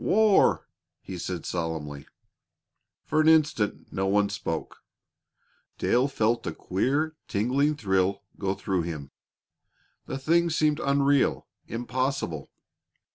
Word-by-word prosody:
"War!" 215 -1 +4 0.4
he 90 -2 -7
said 90 -1 -4
solemnly. 80 -4 -4 1.0
For 155 +1 +2
an 155 - +2
instant 150 -10 +2
no 95 0 0
one 100 +1 +3
spoke. - - -5 0.9
Dale 125 +3 +2
felt 115 -4 0
a - - -3
queer, 145 +11 0
tingling 135 +8 +1
thrill 95 -4 0 0.2
go 95 -1 -1
through 95 -2 -1
him. 80 -4 -6 1.0
The - - -3
thing 170 +5 +2
seemed 155 -1 +2
unreal, 140 0 +2 0.2
impossible. 125 - -2
120 Hz, 110 wpm, -27 LUFS, 95-145 Hz, 1.0 s, War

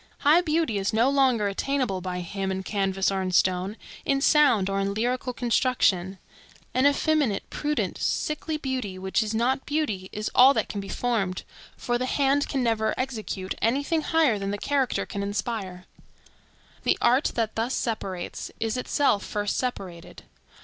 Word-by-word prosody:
High 310 +5 +5
beauty 310 - 0
is 195 +3 -1
no 235 +5 +3
longer 260 -7 +3
attainable 230 -1 -1
by 180 0 -4
him 195 +2 -4
in 190 0 -3
canvas 195 -1 0
or 195 -1 -1
in 185 -1 -2
stone, 185 +3 +1 0.3
in 275 0 +1
sound, 275 -9 +4
or 195 0 -1
in 195 0 -1
lyrical 250 +3 -1
construction; 230 -7 +1 0.6
an 260 +2 +4
effeminate, 285 -6 +1
prudent, 300 0 -2
sickly 305 +1 -1
beauty, 255 -9 -3
which 190 +4 0
is 220 0 -2
not 255 +4 +1
beauty, 220 -12 -2
is 210 0 -4
all 265 +3 +7
that - - 0
can 205 - -4
be 195 - -9
formed; 200 -5 -1 0.3
for 240 0 -1
the 255 - -1
hand 280 +1 +1
can 270 -3 0
never 225 -2 +1
execute 215 -7 -3
any 250 +6 +2
thing 320 +2 0
higher 305 -9 +2
than 195 0 -3
the 205 - -2
character 275 +3 0
can 200 - -5
inspire. 200 -3 -4 1.0
The - - +2
art 255 +4 +3
that 225 -2 0
thus 230 +4 -1
separates 195 -6 -4
is 225 +2 -1
itself 250 -4 +1
first 205 -1 -2
separated. 190 -9 -5
225 Hz, 165 wpm, -26 LUFS, 195-270 Hz, 1.0 s, all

